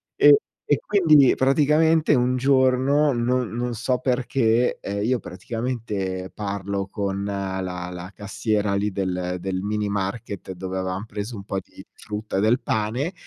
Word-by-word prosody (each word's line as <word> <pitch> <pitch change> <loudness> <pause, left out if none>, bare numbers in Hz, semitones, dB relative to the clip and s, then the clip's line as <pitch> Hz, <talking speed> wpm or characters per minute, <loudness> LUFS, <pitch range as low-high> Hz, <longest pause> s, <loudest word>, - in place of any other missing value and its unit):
e 145 -1 +7 0.3
e 145 - +2
quindi 180 -7 +4
nie 135 -3 +6
praticamente 150 +3 +3
un 125 0 +2
giorno, 135 +2 +3
non 120 0 0
non 120 +2 -3
so 125 +3 0
perché, 125 -2 +1
ehm, 100 +1 -3
io 125 +3 +1
praticamente, 100 -3 -4
parlo 100 -1 -3
con 100 0 -3
la 100 -2 -3
la 90 0 -6
cassiera 105 0 -1
lì 100 +1 0
del 90 -1 -2
del 95 0 -2
minimarket 100 -1 -3
dove 95 +1 -5
avevam 95 +2 -3
preso 105 +2 -6
un 100 - -7
po' 95 -1 -3
di - - -14
frutta 105 -1 -5
e 95 - +2
del 115 +4 +3
pane, 115 - -1
105 Hz, 150 wpm, -23 LUFS, 95-125 Hz, 0.3 s, e